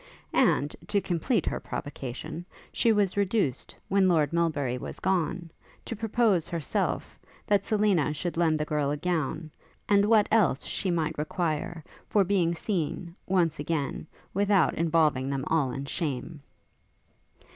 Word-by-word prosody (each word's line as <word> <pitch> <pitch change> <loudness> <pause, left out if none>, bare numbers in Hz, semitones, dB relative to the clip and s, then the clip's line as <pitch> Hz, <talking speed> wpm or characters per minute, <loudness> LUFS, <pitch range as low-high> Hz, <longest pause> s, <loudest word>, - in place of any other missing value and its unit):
And, - - +2
to 205 - +2
complete 190 - 0
her - - -1
provocation, 140 +4 -6 0.3
she 230 - +3
was 205 -3 +2
reduced, 200 - 0
when 195 -1 +3
Lord 155 -3 +2
Melbury 150 -7 0
was - - -6
gone, 175 -2 -1 0.3
to 230 - -4
propose, 220 -5 +1
herself, 165 -5 -2 0.3
that 200 -2 +2
Selina 205 -8 +2
should 165 +3 -3
lend 165 -2 +2
the 150 - -1
girl 150 -2 0
a 145 - -1
gown, 160 -1 -2 0.4
and 200 -1 +4
what 215 -1 +4
else 205 - +3
she 190 - -2
might 165 -4 -1
require, 160 0 -2 0.2
for 205 - +3
being 180 -3 +1
seen, 170 -2 -3
once 170 -4 +1
again, 150 -1 -2 0.3
without 200 -2 +3
involving 155 -5 +2
them 135 -1 -2
all 155 -5 +1
in 135 +2 -4
shame. 145 0 -3
170 Hz, 140 wpm, -28 LUFS, 150-195 Hz, 0.4 s, and